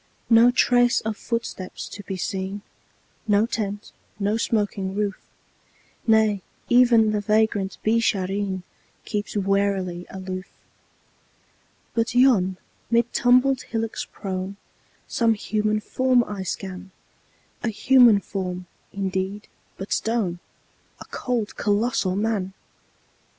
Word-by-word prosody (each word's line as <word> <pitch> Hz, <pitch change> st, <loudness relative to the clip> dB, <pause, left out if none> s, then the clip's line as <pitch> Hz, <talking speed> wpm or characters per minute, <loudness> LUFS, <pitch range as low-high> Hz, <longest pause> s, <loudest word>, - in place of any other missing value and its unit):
No 230 Hz, +1 st, +8 dB
trace 245 Hz, -1 st, +4 dB
of 220 Hz, 0 st, -3 dB
footsteps 230 Hz, -5 st, -4 dB
to 205 Hz, -, -8 dB
be 190 Hz, -1 st, -5 dB
seen, 190 Hz, +2 st, -4 dB, 0.6 s
No 205 Hz, +1 st, +4 dB
tent, 210 Hz, -3 st, -4 dB, 0.3 s
no 205 Hz, +1 st, 0 dB
smoking 205 Hz, -4 st, -1 dB
roof; 205 Hz, -2 st, -1 dB, 0.9 s
Nay, 220 Hz, -3 st, +4 dB, 0.3 s
even 240 Hz, -3 st, +5 dB
the 210 Hz, -1 st, 0 dB
vagrant 210 Hz, -2 st, +1 dB
Beeshareen 200 Hz, -4 st, 0 dB, 0.4 s
Keeps 210 Hz, 0 st, -3 dB
warily 195 Hz, -3 st, 0 dB
aloof. 185 Hz, 0 st, -6 dB, 1.5 s
But 230 Hz, +1 st, 0 dB
yon, 215 Hz, -8 st, +4 dB, 0.3 s
mid 235 Hz, 0 st, +2 dB
tumbled 255 Hz, +2 st, +4 dB
hillocks 225 Hz, -1 st, -3 dB
prone, 190 Hz, 0 st, -5 dB, 0.5 s
Some 230 Hz, -1 st, +2 dB
human 215 Hz, 0 st, 0 dB
form 255 Hz, +2 st, +2 dB
I 205 Hz, -4 st, -6 dB
scan 190 Hz, 0 st, -5 dB, 0.7 s
A 240 Hz, -, 0 dB
human 235 Hz, -1 st, +5 dB
form, 180 Hz, -2 st, -4 dB, 0.3 s
indeed, 195 Hz, +1 st, -3 dB, 0.3 s
but 195 Hz, -, -3 dB
stone: 215 Hz, -7 st, -1 dB, 0.6 s
A -, -, -10 dB
cold, 240 Hz, -4 st, -3 dB
colossal 205 Hz, -3 st, +1 dB
Man! 205 Hz, -2 st, -1 dB
205 Hz, 105 wpm, -24 LUFS, 190-230 Hz, 1.5 s, No